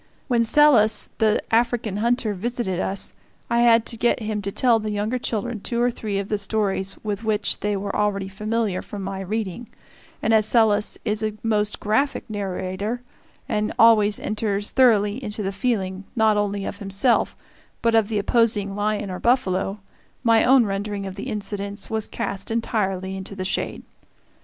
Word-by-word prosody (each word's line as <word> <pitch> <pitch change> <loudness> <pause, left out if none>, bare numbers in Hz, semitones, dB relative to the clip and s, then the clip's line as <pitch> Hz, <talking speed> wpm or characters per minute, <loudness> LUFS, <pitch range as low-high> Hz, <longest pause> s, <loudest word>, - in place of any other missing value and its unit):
When 240 -4 +2
Selous, 230 -4 +5
the 215 -1 +3
African 230 -3 +1
hunter, 235 0 +1
visited 210 -2 -3
us, 195 +1 -3 0.4
I 235 - +3
had 230 -1 +5
to 235 - -3
get 235 +2 +1
him 215 -2 -3
to 200 0 -4
tell 235 +1 +3
to - - -8
the 215 - -2
younger 210 +4 -1
children 235 0 -2
two 235 +4 -3
or 245 +1 +3
three 210 -4 -4
of 200 0 -2
the 210 -1 -1
stories 200 -2 -1
with 210 0 -3
which 215 -2 0
they 205 -1 -1
were 200 +1 -4
already 205 -2 0
familiar 210 0 -2
from 200 -2 -7
my 195 0 -4
reading; 215 +3 -4 0.5
and 225 - +1
as 215 -1 +4
Selous 220 -3 +3
is 210 -1 0
a 215 -1 -2
most 210 -2 0
graphic 250 +8 0
narrator, 200 +3 -3 0.4
and 215 -4 -1
always 215 -2 +5
enters 210 -1 -1
thoroughly 225 -2 +3
into 210 -1 -4
the 195 - -1
feeling 195 -4 -2
not 220 -2 +4
only 205 -1 -1
of - - -5
himself 200 +5 +1 0.5
but 230 -1 +3
of 225 -2 +4
the 220 -1 -2
opposing 205 -2 +1
lion 205 -1 -1
or 180 - -5
buffalo, 200 -5 +1 0.4
my 230 -2 +4
own 255 -1 +5
rendering 200 0 -3
of 190 - -5
the 200 - -6
incidents 205 -1 -5
was 220 -1 -1
cast 200 -4 -3
entirely 195 -5 -1
into 190 +1 -7
the 185 -1 -4
shade. - - -2
210 Hz, 175 wpm, -23 LUFS, 200-230 Hz, 0.5 s, Selous